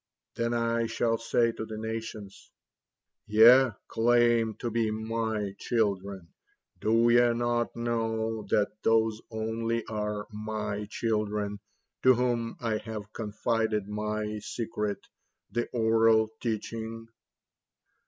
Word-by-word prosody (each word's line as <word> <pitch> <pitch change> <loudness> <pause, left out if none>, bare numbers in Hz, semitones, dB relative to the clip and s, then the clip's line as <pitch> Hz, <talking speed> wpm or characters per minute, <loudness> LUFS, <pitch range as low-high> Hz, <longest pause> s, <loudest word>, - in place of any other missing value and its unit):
Then 115 0 -1
I 115 0 +1
shall 115 0 0
say 115 0 +2
to 110 - -6
the 110 -1 -6
nations: 110 -2 -6 0.8
'Ye 120 +5 +7 0.2
claim 120 -1 +3
to 120 - -4
be 115 -1 +1
MY 110 -2 -2
children, 100 -6 -1 0.5
do 115 +2 +3
ye 120 0 +5
not 120 0 0
know 115 -1 -1
that 105 +1 0
those 110 -1 +2
only 115 +1 -2
are 105 -1 -3
My 105 -1 -4
children 105 -2 -1 0.4
to 130 0 +6
whom 120 -2 0
I 115 -2 -1
have 105 -2 -7
confided 110 -1 -1
My 105 0 -3
secret, 105 -2 -4 0.5
the 120 0 -1
oral 110 -1 +3
teaching?'" 115 0 -4
110 Hz, 110 wpm, -28 LUFS, 105-115 Hz, 0.8 s, Ye